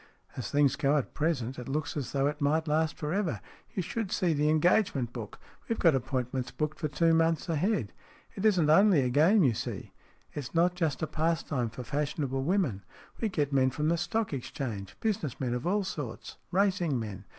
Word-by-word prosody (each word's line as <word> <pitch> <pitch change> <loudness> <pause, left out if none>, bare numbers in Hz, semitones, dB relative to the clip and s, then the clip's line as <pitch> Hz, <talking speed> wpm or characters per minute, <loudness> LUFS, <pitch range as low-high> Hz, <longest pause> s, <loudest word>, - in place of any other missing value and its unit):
" - - -29
As 120 -6 -4
things 145 -1 +3
go 145 0 +2
at 140 - -2
present, 135 -6 -1
it 125 - -7
looks 155 +3 -2
as 145 -4 -3
though 135 -1 +1
it 150 +1 -2
might 155 +3 +1
last 155 +1 +1
for 150 +1 -3
ever. 195 -4 -1 0.4
You 185 - 0
should 205 +3 -3
see 175 -3 +1
the 150 0 +2
engage 175 +6 +3
ment 120 -3 -2
book. 110 -4 -7 0.3
We've 230 - 0
got 165 -3 +4
appointments 130 -1 -2
booked 150 0 -3
for 155 - -1
two 165 +3 +2
months 165 +1 +2
ahead. 165 - 0 0.4
It 195 - -6
isn't 185 -8 +4
only 190 -2 +6
a 125 - +1
game 170 - +5
you 130 -5 +4
see. 115 -2 -5 0.4
It's 145 +2 -6
not 175 +2 +4
just 160 -5 -1
a - - +3
pastime 155 -7 -1
for 120 +3 -8
fashionable 140 0 -2
women. 150 - 0 0.4
We 225 - 0
get 145 -6 -1
men 130 -1 +4
from 150 +4 -1
the 170 - +3
Stock 220 +2 -1
Exchange, 115 -6 -5
business 200 - -2
men 125 -3 -1
of 125 +6 -3
all 200 +2 +2
sorts, 145 -11 -6
racing 185 -7 +1
men. 105 -4 -6
150 Hz, 205 wpm, -29 LUFS, 130-170 Hz, 0.4 s, only